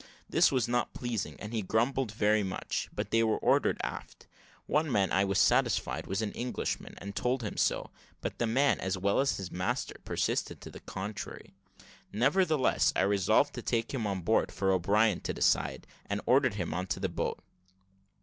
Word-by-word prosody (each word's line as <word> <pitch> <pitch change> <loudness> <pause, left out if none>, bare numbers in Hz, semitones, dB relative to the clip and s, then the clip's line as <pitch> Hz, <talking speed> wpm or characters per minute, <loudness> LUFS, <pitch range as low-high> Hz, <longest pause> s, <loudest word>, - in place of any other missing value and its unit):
This - - +4
was 125 -4 +1
not 120 0 -1
pleasing, 110 -11 -3
and 105 +2 -7
he 110 - 0
grumbled 115 +4 0
very 105 0 +2
much; 95 -1 -3
but - - -4
they 115 - +4
were 110 -1 +2
ordered - - +2
aft. - - -6 0.4
One 155 -1 +1
man 100 -4 +2
I 95 - +3
was 100 -1 0
satisfied - - +2
was 95 +3 -1
an 105 - -2
Englishman, 125 +1 -4
and 100 0 -8
told 125 0 0
him 105 - -4
so; - - 0 0.3
but - - -5
the 120 - +1
man, 135 +5 +3
as 95 0 -2
well 100 +2 +1
as 135 0 +1
the 95 -3 -6
master, 90 0 -2
persisted - - -1
to - - -9
the - - -10
contrary. 100 +2 -7 0.6
Nevertheless 145 - +2
I - - +2
resolved 100 -2 +3
to - - -5
take 115 +2 -1
him 115 -6 -1
on 95 -2 -2
board 85 - +2
for 95 0 0
O'Brien 100 +2 +3
to - - -4
decide, - - +1 0.2
and 100 0 -1
ordered 130 -4 +3
him 90 -5 -3
into 95 +4 -2
the 95 - 0
boat. 85 - -2
105 Hz, 185 wpm, -30 LUFS, 95-120 Hz, 0.6 s, This